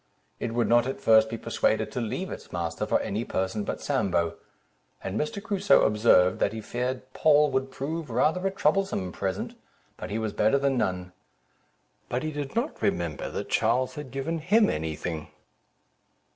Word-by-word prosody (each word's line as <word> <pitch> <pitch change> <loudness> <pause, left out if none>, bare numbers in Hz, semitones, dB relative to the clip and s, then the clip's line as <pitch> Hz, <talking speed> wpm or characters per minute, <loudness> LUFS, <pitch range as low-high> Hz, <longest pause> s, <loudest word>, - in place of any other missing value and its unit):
It 115 - -3
would 120 -2 +2
not 120 +2 +4
at 135 - -4
first 110 0 +5
be 115 - -4
persuaded - - 0
to 125 - -3
leave 180 - -3
its - - -9
master 85 -2 -3
for - - +2
any 105 +4 -2
person 95 0 -2
but - - -4
Sambo; 85 -3 0 0.7
and 95 - -4
Mr. 150 - -2
Crusoe 200 -2 +3
observed, 105 -4 +4
that - - +1
he 110 - -4
feared 125 +4 -3
Poll 150 -1 +4
would 130 0 0
prove 150 +3 -4
rather 155 +11 +1
a - - +2
troublesome 190 - 0
present, 95 +2 -3 0.4
but - - -6
he 105 - -2
was 110 -2 -2
better 110 +6 +3
than 140 -1 +1
none; 90 -6 -1 1.0
but 125 +3 -1
he 155 - -2
did 145 +1 -5
not 235 +6 -2
remember - - -1
that - - -5
Charles 130 0 +2
had 150 -4 -7
given 135 +6 -3
him 205 +7 +3
any 80 0 -3
thing. 80 -1 -5
125 Hz, 175 wpm, -27 LUFS, 105-155 Hz, 1.0 s, first